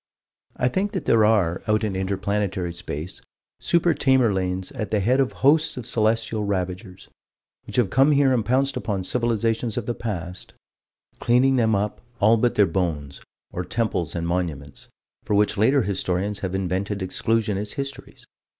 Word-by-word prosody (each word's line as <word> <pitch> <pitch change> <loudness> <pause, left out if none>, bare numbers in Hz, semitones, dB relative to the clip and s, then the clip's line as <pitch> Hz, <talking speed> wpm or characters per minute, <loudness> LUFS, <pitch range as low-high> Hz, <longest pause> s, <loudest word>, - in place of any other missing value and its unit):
I 125 - +1
think 190 +11 -1
that - - -3
there 110 -2 +4
are, 100 -6 +2
out 105 +1 +2
in 105 -3 -1
inter 95 +1 -1
planetary 95 -3 -2
space, 80 0 -7 0.4
Super 170 0 +2
Tamerlanes 95 -9 +1
at 110 -8 -5
the 105 - +1
head 125 +7 +2
of 135 -2 +2
hosts 155 +1 +4
of 125 - -6
celestial 110 -1 0
ravagers 95 -1 -4 0.6
which - - -6
have 115 -7 +2
come 135 +3 +4
here 140 -2 +4
and 120 -3 +1
pounced 135 +4 +1
upon 105 -6 -2
civilizations 115 +1 -1
of 120 - -2
the 120 - -1
past, 90 -6 -6 0.7
cleaning 130 +3 +3
them 110 -3 +2
up 105 +1 -2 0.2
all 110 +2 +5
but 120 +2 +1
their 105 - +5
bones, 80 -6 -3 0.3
or 90 - -4
temples 90 -6 -2
and 85 -1 -2
monuments 80 -6 -4 0.4
for 105 - -1
which 105 +1 +2
later 130 +6 +3
historians 100 +1 -2
have 95 -1 -3
invented 95 +2 -2
exclusionist 105 +1 -1
histories. 140 0 -7
105 Hz, 160 wpm, -23 LUFS, 95-120 Hz, 0.7 s, all